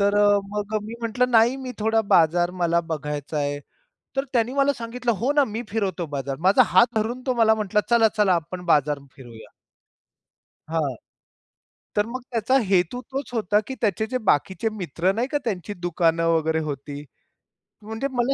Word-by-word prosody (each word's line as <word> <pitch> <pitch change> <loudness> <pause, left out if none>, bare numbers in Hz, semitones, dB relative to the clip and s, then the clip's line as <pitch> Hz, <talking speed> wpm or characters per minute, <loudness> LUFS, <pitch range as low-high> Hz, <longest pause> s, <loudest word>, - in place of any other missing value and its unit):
तर 200 0 +3
अ, 205 0 +5
मग 210 +1 -4
अ, - - +3
मी 220 +2 -7
म्हटलं, 240 +2 0
"नाही 235 +2 +4
मी 260 -2 -6
थोडा 225 +1 +2
बाजार 175 +1 +4
मला 170 0 +3
बघायचा 150 0 -4
आहे", 145 0 -1 0.6
तर 270 +1 0
त्यानी 240 +1 +1
मला 280 0 +2
सांगितलं, 235 0 -3
"हो 235 +6 0
ना, 290 -1 +4
मी 220 +1 -4
फिरवतो 195 -5 -2
बाजार". 135 0 -3
माझा 195 - +6
हात 235 - +7
धरून 230 +4 -1
तो 255 - +2
मला 220 -1 +5
म्हटला, 210 -1 0
"चला-चला 220 -4 +3
आपण 175 +2 -5
बाजार 145 -2 +2 0.2
फिरूया". 115 -5 -13 1.2
हां, 155 -6 -1 1.0
तर 210 - +2
मग 255 +2 -5
त्याचा 235 +3 +2
हेतू 185 +5 +2
तोच 270 -1 -4
होता 210 -3 +2
की 265 - -5
त्याचे 220 0 +1
जे 255 - +2
बाकीचे 190 +9 +1
मित्र 175 +2 0
नाही 230 +5 -1
का? 290 - +2
त्यांची 205 -2 -3
दुकानं 170 -2 0
वगैरे 160 -1 +1
होती. 145 -1 -6 0.8
म्हणजे 220 +5 -4
मला 250 +1 +1
205 Hz, 170 wpm, -23 LUFS, 165-235 Hz, 1.2 s, हात